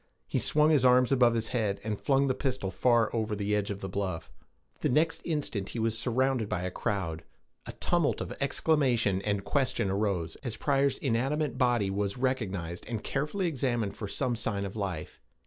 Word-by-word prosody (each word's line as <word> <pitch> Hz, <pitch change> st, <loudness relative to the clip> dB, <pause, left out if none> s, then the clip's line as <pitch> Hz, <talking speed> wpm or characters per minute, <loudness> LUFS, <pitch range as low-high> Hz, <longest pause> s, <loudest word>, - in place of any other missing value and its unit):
He -, -, -1 dB
swung 150 Hz, +1 st, +3 dB
his 145 Hz, -5 st, +4 dB
arm 125 Hz, 0 st, +6 dB
above 125 Hz, -3 st, +4 dB
his 115 Hz, -1 st, -1 dB
head, 105 Hz, -5 st, 0 dB
and 105 Hz, -1 st, -1 dB
flung 135 Hz, 0 st, +3 dB
the 130 Hz, -, +2 dB
pistol 130 Hz, -8 st, -2 dB
far 120 Hz, +3 st, +2 dB
over 110 Hz, -1 st, -1 dB
the 105 Hz, 0 st, 0 dB
edge 105 Hz, 0 st, -1 dB
of 100 Hz, -1 st, -4 dB
the 95 Hz, -, -3 dB
bluff. 95 Hz, -3 st, -3 dB, 0.5 s
The -, -, 0 dB
next 160 Hz, +5 st, +2 dB
instant 140 Hz, -, -2 dB
he -, -, -6 dB
was 115 Hz, 0 st, 0 dB
surrounded 125 Hz, -1 st, 0 dB
by 90 Hz, -, -2 dB
a 90 Hz, -, -2 dB
crowd; 85 Hz, -5 st, -2 dB, 0.4 s
a -, -, -6 dB
tumult -, -, +1 dB
of -, -, -4 dB
exclamation 120 Hz, -11 st, +2 dB
and 100 Hz, -1 st, -1 dB
question 125 Hz, -5 st, 0 dB
arose, 95 Hz, -5 st, -1 dB
as 120 Hz, -5 st, -5 dB
Pryor's 140 Hz, -1 st, +2 dB
inanimate 135 Hz, +2 st, -1 dB
body 120 Hz, -6 st, +2 dB
was 100 Hz, +1 st, -2 dB
recognized, 100 Hz, -10 st, -2 dB
and 115 Hz, -3 st, -4 dB
carefully 150 Hz, +8 st, -1 dB
examined 125 Hz, -, -1 dB
for 105 Hz, -, -5 dB
some 120 Hz, +4 st, -1 dB
sign 105 Hz, -3 st, -1 dB
of 100 Hz, -, -6 dB
life. 95 Hz, -7 st, -4 dB
115 Hz, 185 wpm, -29 LUFS, 100-130 Hz, 0.5 s, arm